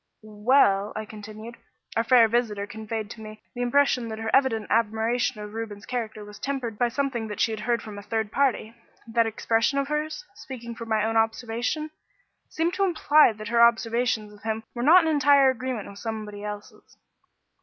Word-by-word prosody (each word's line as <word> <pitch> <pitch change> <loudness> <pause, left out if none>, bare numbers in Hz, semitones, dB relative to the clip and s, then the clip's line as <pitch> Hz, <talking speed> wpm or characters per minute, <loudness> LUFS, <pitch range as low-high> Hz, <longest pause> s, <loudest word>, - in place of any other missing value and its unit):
"Well," 210 -2 +2
I 215 - -4
continued, 215 +2 -10 0.4
"our 230 - +2
fair 235 -1 +6
visitor 220 -3 0
conveyed 220 +1 -5
to 220 - -10
me 215 0 -11
the 245 - -5
impression 250 -1 +2
that 220 -1 -5
her 220 0 -3
evident 250 -6 +2
admiration 225 +2 +1
of 210 0 -8
Reuben's 220 -2 -6
character 220 -4 -4
was 210 0 -12
tempered 255 -6 -4
by 245 - +3
something 245 -2 -2
that 210 - -7
she 225 - +2
had 220 - -4
heard 235 +1 -1
from 210 -2 -8
a - - -8
third 220 0 -3
party. 255 -5 0 0.3
That 230 0 +1
expression 225 +3 0
of 275 0 -1
hers, 305 +3 -3
'speaking 240 -9 -8
from 230 0 -9
my 215 -1 +1
own 225 0 0
observation,' 235 +7 -1 0.6
seemed 330 +2 -1
to 395 - 0
imply 310 -6 +4
that 215 0 -8
her 235 0 +3
observations 235 -2 +2
of 205 - -17
him 220 0 -3
were 240 - -4
not 330 +7 +7
in 320 - +1
entire 280 -2 +5
agreement 255 -4 -4
with 200 0 -11
somebody 215 -2 -6
else's." 210 0 -9
225 Hz, 185 wpm, -25 LUFS, 215-255 Hz, 0.6 s, not